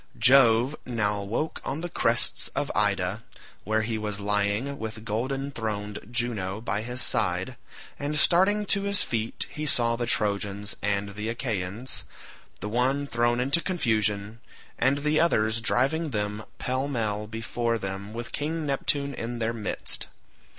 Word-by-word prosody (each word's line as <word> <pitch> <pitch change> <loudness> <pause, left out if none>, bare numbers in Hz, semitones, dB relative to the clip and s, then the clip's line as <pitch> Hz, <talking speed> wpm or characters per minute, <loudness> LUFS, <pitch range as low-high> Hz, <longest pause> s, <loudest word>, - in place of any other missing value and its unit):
Jove 125 +1 +6
now 105 -4 0
woke 115 +11 -2
on 140 +4 -3
the 175 - -2
crests 120 -9 +2
of - - -1
Ida, 100 0 +1 0.4
where 110 +2 +1
he 110 0 -2
was 105 -1 -3
lying 105 +7 0
with 110 0 -6
golden 135 +6 -2
throned 105 -4 -3
Juno 115 -5 -1
by 110 -2 -1
his 125 +3 +1
side, - - +2 0.4
and 145 +1 -1
starting 190 +7 +4
to 200 0 +2
his 200 0 +2
feet 115 -1 -1
he 150 0 -3
saw 115 -4 +4
the 120 0 -2
Trojans 100 -2 0
and 100 0 0
Achaeans, 110 +1 -3 0.6
the 105 - -3
one 130 +5 +1
thrown 120 -1 +1
into 140 +6 +2
confusion, 110 - 0 0.4
and 140 +2 +2
the 150 +1 +3
others 110 -9 +2
driving 140 +8 +1
them 105 -2 -2
pell 130 +2 -1
mell 105 -6 -1
before 115 +1 -1
them 100 0 -5
with 115 0 -6
King 155 +2 -2
Neptune 140 0 0
in 120 -1 -4
their 115 0 -1
midst. 110 -4 -4
115 Hz, 145 wpm, -27 LUFS, 105-135 Hz, 0.6 s, Jove